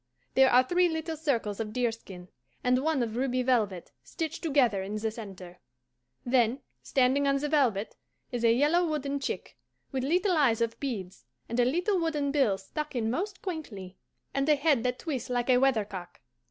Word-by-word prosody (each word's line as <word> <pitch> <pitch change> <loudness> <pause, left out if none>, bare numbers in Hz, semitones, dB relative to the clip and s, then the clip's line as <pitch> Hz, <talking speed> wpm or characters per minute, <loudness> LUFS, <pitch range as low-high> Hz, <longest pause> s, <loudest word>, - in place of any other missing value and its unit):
There 265 0 +6
are 250 +1 +6
three 355 +6 +2
little 320 0 -3
circles 240 -10 -1
of 215 -1 -4
deerskin 225 -7 -3 0.3
and 250 0 +3
one 310 -5 +1
of 225 -1 -4
ruby 255 0 0
velvet, 215 -8 0
stitched 320 -3 -5
together 270 - +2
in 200 +2 -5
the 220 +1 -2
centre. 190 -5 -10 0.7
Then, 245 +1 +2 0.2
standing 270 +2 +2
on 275 - +3
the 295 +2 -2
velvet 250 -9 +1 0.4
is 240 -2 -3
a 230 - +5
yellow 295 +9 +3
wooden 285 -4 -1
chick, 275 - -5 0.3
with 265 -1 -2
little 360 +6 +2
eyes 255 -7 +3
of 230 0 -1
beads, 200 -9 -5 0.2
and 235 +2 -2
a 245 - +5
little 355 - +1
wooden 300 -4 0
bill 265 -9 +2
stuck 295 +10 -6
in 225 -2 0
most 380 - -3
quaintly, 225 - -6 0.4
and 275 +2 0
a 300 - +6
head 285 -3 +2
that 250 0 0
twists 270 -8 -4
like 245 +1 +1
a 250 - +5
weathercock. 210 -9 -1
255 Hz, 180 wpm, -29 LUFS, 225-295 Hz, 0.7 s, There